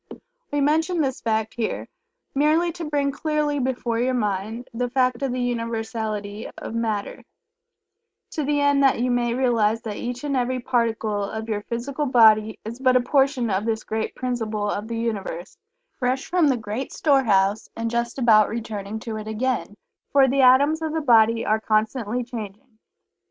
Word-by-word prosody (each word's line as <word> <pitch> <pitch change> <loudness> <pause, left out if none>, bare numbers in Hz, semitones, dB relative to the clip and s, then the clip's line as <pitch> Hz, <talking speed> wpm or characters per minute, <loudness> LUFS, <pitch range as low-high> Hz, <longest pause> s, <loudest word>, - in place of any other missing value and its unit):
We 290 0 0
mention 320 +5 +1
this 270 -4 -1
fact 220 -1 -1
here 230 -2 -3 0.5
merely 310 +5 +2
to 335 0 -6
bring 285 -1 +1
clearly 300 0 -1
before 245 -3 -1
your 255 +1 +1
mind 215 +2 -2
the 245 +1 -2
fact 255 -1 +1
of 270 -2 -1
the 250 - -2
Universality 225 -3 -3
of - - -7
Matter, 220 -3 -2 1.1
to 305 - -2
the 290 +1 +1
end 285 -1 +3
that 270 -4 +4
you 250 +1 +1
may 240 -1 +1
realize 230 -3 +1
that 215 -3 -5
each 245 +2 -5
and 285 -2 -1
every 255 0 0
particle 225 -4 0
of 220 +2 -5
your 210 -2 -2
physical 265 +7 -3
body 220 -3 +5
is 230 +3 -6
but 255 -1 +3
a - - +6
portion 265 -3 +1
of 190 +2 0
this 220 -1 -1
great 220 0 -3
principle 225 -4 -2
of 205 +2 -4
the 230 0 -4
Universe, 200 -7 -4 0.4
fresh 255 +1 0
from 350 -3 +2
the 265 -3 +2
great 220 +4 -5
store 280 -3 +3
house, 200 0 +2
and 230 0 -3
just 235 +1 -2
about 220 -5 +5
returning 215 -2 -5
to 225 -2 -5
it 215 0 -7
again, 220 -1 -2 0.3
for 275 -1 +5
the 270 +1 +2
atoms 280 +5 +5
of 315 -1 -2
the 320 - -1
body 230 -4 +4
are 215 +1 +2
constantly 220 +2 0
changing. 225 0 -9
235 Hz, 175 wpm, -23 LUFS, 220-265 Hz, 1.1 s, a